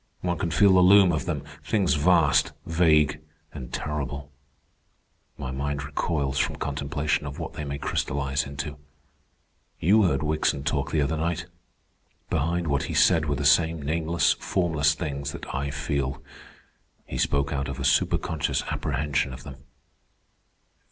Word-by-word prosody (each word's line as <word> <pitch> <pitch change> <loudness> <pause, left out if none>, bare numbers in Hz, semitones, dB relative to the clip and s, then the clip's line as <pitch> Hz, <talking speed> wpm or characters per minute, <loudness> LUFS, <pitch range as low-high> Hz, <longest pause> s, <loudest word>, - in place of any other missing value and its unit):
One 90 -2 -1
can 85 - -1
feel 100 +3 +5
the 95 - +6
loom 95 0 +7
of 80 - -2
them—things 75 +5 -1
vast, 80 0 +3
vague, 75 -3 +3 0.3
and 65 -5 -8
terrible. 70 -1 -4 1.1
My 65 -2 -5
mind 70 +2 -3
recoils 70 -1 -1
from - - 0
contemplation 70 +1 -2
of 70 - -7
what - - -6
they 75 - -5
may 70 -1 -4
crystallize 70 -1 -1
into. 70 +1 -6 1.0
You 105 +7 +4
heard 85 - +1
Wickson 75 -2 0
talk 70 -2 -1
the 75 -3 +1
other 75 +3 -1
night. 85 +1 -2 0.9
Behind 85 +4 0
what 70 -4 0
he - - -3
said 80 -1 +4
were 70 - 0
the 75 - -3
same 80 +3 +4
nameless, 80 +3 +1
formless 80 -5 +1
things 70 -3 -4
that - - -8
I 70 +2 -2
feel. 70 -1 -3 0.8
He - - -5
spoke 70 0 +1
out 70 -1 -2
of 70 -1 -5
a - - -3
superconscious 75 +2 +1
apprehension 70 -2 -1
of 65 +1 -10
them." - - -9
75 Hz, 145 wpm, -26 LUFS, 70-80 Hz, 1.1 s, loom